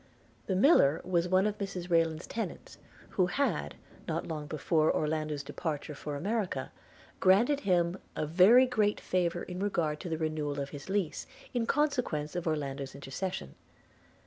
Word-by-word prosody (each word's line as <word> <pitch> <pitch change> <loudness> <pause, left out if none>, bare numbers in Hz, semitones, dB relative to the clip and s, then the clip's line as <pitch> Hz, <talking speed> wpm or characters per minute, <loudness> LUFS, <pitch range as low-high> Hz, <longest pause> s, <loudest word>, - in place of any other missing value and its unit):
The 190 - 0
miller 185 - +5
was 175 -1 +1
one 185 +2 +4
of 210 0 -1
Mrs 185 -3 -5
Rayland's 165 -1 +2
tenants, 225 - -6 0.3
who 185 -2 +2
had 280 +9 -1 0.3
not - - -2
long 150 -2 -4
before 155 +1 +2
Orlando's 155 -1 -1
departure 150 0 -4
for 145 0 -5
America 190 - -2 0.5
granted 235 +10 +4
him 180 -3 +1 0.2
a - - -1
very 190 - +7
great 215 -5 +1
favour 175 -1 0
in 180 0 -6
regard 170 -7 0
to 175 - -6
the 160 - -1
renewal 155 -2 -2
of 140 0 -4
his 145 +3 -9
lease, 195 -5 -1 0.3
in 235 -2 0
consequence 250 - 0
of 175 -1 -2
Orlando's 140 -3 -3
intercession. 140 - -5
170 Hz, 150 wpm, -30 LUFS, 150-195 Hz, 0.5 s, very